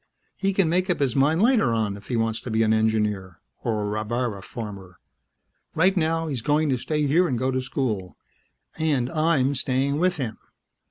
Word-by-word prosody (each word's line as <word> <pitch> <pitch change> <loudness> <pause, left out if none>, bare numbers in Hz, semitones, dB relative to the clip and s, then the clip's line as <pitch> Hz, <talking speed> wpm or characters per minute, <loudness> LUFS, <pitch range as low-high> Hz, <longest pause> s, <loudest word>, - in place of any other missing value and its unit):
He 195 0 0
can 195 -3 +2
make 180 +4 +1
up 175 - +1
his 135 -4 +1
mind 150 +7 +3
later 225 - +3
on 110 -3 0
if 100 - -13
he 125 - -2
wants 115 -1 0
to - - -7
be 110 0 +2
an 110 0 +3
engineer 105 -5 0 0.2
or 110 -3 -1
a - - -2
rabbara 110 0 -2
farmer. 100 -5 -8 0.8
Right 185 +4 +3
now, 165 -1 +1
he's 140 -7 -3
going 150 +4 +1
to 130 - +1
stay 150 +4 -1
here 170 +6 +3
and 130 - -1
go 130 +2 0
to 130 0 -1
school... 115 -8 -3 0.6
and 140 -6 +1
I'm 155 -4 +2
staying 135 +2 0
with 180 0 +2
him." 120 -6 -4
130 Hz, 195 wpm, -24 LUFS, 110-155 Hz, 0.8 s, mind